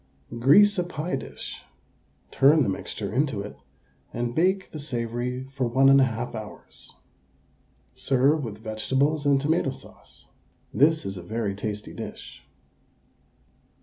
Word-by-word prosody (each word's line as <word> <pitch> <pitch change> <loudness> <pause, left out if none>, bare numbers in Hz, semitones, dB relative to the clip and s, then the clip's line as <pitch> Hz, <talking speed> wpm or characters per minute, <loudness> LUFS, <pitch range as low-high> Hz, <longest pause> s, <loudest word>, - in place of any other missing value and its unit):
Grease 200 - +6
a - - +2
pie 175 0 -3
dish, - - -7 0.7
turn 145 +2 +5
the 115 - 0
mixture 100 +1 -5
into 135 -5 0
it, 105 - -9 0.6
and 120 0 -3
bake 185 +5 +1
the 155 - -7
savoury 125 -2 -3
for 130 -3 -1
1 135 +3 +4
1/2 130 -4 +3
hours. 110 -2 -10 1.0
Serve 140 +3 +2
with 110 -4 -6
vegetables 135 +7 -1
and 140 -1 +4
tomato 150 +1 +1
sauce. - - -13 0.4
This 155 0 +3
is 95 0 -4
a - - -6
very 105 +2 -3
tasty 105 +1 -5
dish. - - -9
130 Hz, 125 wpm, -25 LUFS, 110-150 Hz, 1.0 s, Grease